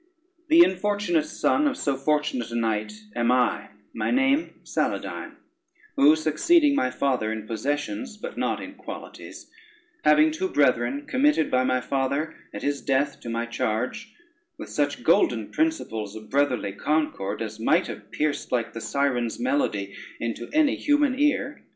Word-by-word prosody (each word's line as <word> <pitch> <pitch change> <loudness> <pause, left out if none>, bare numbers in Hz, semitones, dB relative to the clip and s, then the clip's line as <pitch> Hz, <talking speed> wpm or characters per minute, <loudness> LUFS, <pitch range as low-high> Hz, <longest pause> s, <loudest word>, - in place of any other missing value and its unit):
The 330 +2 +8
infortunate 190 - 0
son 300 - +1
of 280 - -1
so 140 -2 0
fortunate 135 -3 0
a 120 - -5
knight 110 -2 -1 0.2
am 120 0 +2
I; 125 -1 +1 0.2
my - - -2
name, 275 +4 +1
Saladyne; - - -3 0.6
who 150 +3 +6
succeeding 285 - +3
my 130 - +1
father 130 -5 0
in 110 -1 -5
possessions, 115 - -3
but - - -7
not - - -1
in - - -8
qualities, - - -10 0.5
having 310 +1 +5
two 370 +4 -2
brethren 130 - +1
committed 265 - +2
by 130 0 +3
my 130 0 +1
father 140 +5 -1 0.2
at - - -7
his 145 0 -1
death 140 +1 0
to 115 - -8
my 115 0 -2
charge, 120 - -3 0.4
with - - -8
such - - -1
golden - - +2
principles 110 - -1
of 110 0 -11
brotherly 135 -7 +1
concord, 105 -5 -1
as 110 0 -7
might 160 +10 +3
have - - -8
pierced 150 -1 -2
like 120 -2 -1
the 115 - -6
Sirens' 125 -5 -1
melody 255 - -1 0.2
into 115 0 -4
any 305 -2 +3
human 290 -2 +2
ear. 285 -1 +1
140 Hz, 150 wpm, -25 LUFS, -, 0.6 s, The